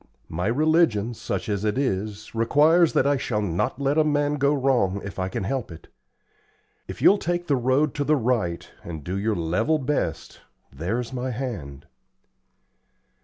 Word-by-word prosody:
My 90 Hz, +4 st, -2 dB
religion, 130 Hz, -4 st, +2 dB
such -, -, -4 dB
as 100 Hz, -1 st, -2 dB
it 105 Hz, +2 st, 0 dB
is, 105 Hz, -4 st, -2 dB
requires 150 Hz, +9 st, +4 dB
that -, -, +3 dB
I 140 Hz, 0 st, +3 dB
shall 120 Hz, -5 st, -2 dB
not 90 Hz, +6 st, -1 dB
let 140 Hz, +2 st, +1 dB
a -, -, +5 dB
man 145 Hz, -1 st, +1 dB
go 140 Hz, 0 st, +2 dB
wrong 130 Hz, -9 st, +1 dB
if 100 Hz, -1 st, -7 dB
I 95 Hz, 0 st, -1 dB
can 95 Hz, -, -3 dB
help 130 Hz, 0 st, -3 dB
it. 85 Hz, 0 st, -12 dB, 1.0 s
If -, -, -7 dB
you'll 200 Hz, -, +6 dB
take 175 Hz, +1 st, -2 dB
the 145 Hz, -, +2 dB
road 130 Hz, +3 st, +1 dB
to 145 Hz, -, -1 dB
the 155 Hz, +2 st, +3 dB
right 115 Hz, -, -1 dB, 0.2 s
and 80 Hz, -3 st, -7 dB
do 90 Hz, +5 st, -4 dB
your 105 Hz, +2 st, 0 dB
level 100 Hz, -, +1 dB
best, 145 Hz, +1 st, -3 dB, 0.3 s
there's 115 Hz, -, -3 dB
my 130 Hz, 0 st, -3 dB
hand." 110 Hz, -, -5 dB
125 Hz, 170 wpm, -24 LUFS, 100-145 Hz, 1.0 s, you'll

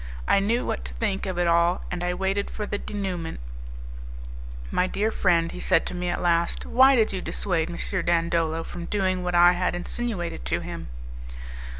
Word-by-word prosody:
I -, -, +5 dB
knew 225 Hz, +5 st, +1 dB
what 60 Hz, -, -2 dB
to -, -, -7 dB
think 190 Hz, -, -1 dB
of 185 Hz, -2 st, -3 dB
it 175 Hz, -, +2 dB
all, 170 Hz, +1 st, +3 dB
and 175 Hz, 0 st, -3 dB
I 180 Hz, 0 st, 0 dB
waited 195 Hz, +2 st, -1 dB
for 210 Hz, -, -4 dB
the 205 Hz, 0 st, -3 dB
'denouement'. 185 Hz, -5 st, -4 dB, 1.3 s
"My 185 Hz, -, +2 dB
dear 215 Hz, +4 st, 0 dB
friend," 170 Hz, -5 st, +2 dB
he -, -, -7 dB
said 165 Hz, -, +2 dB
to -, -, -4 dB
me 180 Hz, 0 st, -2 dB
at 175 Hz, -, -2 dB
last, 170 Hz, -1 st, +1 dB
"why 265 Hz, +2 st, +6 dB
did 220 Hz, -4 st, +2 dB
you 185 Hz, -, -3 dB
dissuade 175 Hz, -4 st, -1 dB
M. 170 Hz, -, -6 dB, 0.3 s
Dandolo 165 Hz, -1 st, +1 dB
from 175 Hz, 0 st, -7 dB
doing 185 Hz, -1 st, 0 dB
what 180 Hz, 0 st, -1 dB
I 175 Hz, +1 st, +7 dB
had 180 Hz, 0 st, 0 dB
insinuated 175 Hz, -, -3 dB
to -, -, -1 dB
him?" -, -, -6 dB
180 Hz, 190 wpm, -25 LUFS, 170-195 Hz, 1.3 s, I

